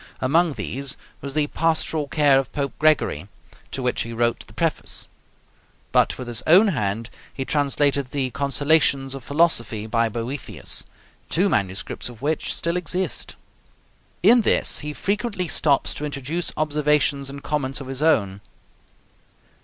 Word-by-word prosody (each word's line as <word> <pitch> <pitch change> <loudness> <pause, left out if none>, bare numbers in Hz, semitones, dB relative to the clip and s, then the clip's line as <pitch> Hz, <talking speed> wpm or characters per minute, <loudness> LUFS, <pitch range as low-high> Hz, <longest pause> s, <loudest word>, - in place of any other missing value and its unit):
Among 160 +5 +2
these 140 +1 -4 0.2
was 140 0 -6
the 150 -1 +3
'Pastoral 160 -1 0
Care 140 -2 +4
of 135 -1 -4
Pope 140 -2 -2
Gregory,' 155 -1 +2 0.4
to 130 - -4
which 125 - 0
he 115 - -5
wrote 120 0 0
the - - -16
Preface; - - 0 0.8
but - - +3
with 125 - -7
his 120 -1 -2
own 190 +7 +7
hand 110 - -2 0.2
he 135 - -5
translated 140 -2 +1
the 130 -2 -2
'Consolations 140 0 +2
of 135 -2 -7
Philosophy,' 120 -9 +1
by 115 +1 +1
Boethius, 120 +5 -3 0.4
two 190 +4 +2
manuscripts 100 - -2
of 120 -3 -12
which 150 +3 -1
still 170 +1 -1
exist. 180 0 -2 0.9
In 235 +5 +7
this - - +3
he 150 0 -5
frequently 200 +2 -2
stops 145 -3 +2
to 150 - -4
introduce 150 +4 -3
observations 150 -2 +1
and 140 0 -9
comments 140 -3 -2
of 135 - -7
his 135 +1 -5
own. 100 -11 +2
140 Hz, 145 wpm, -23 LUFS, 130-155 Hz, 0.9 s, own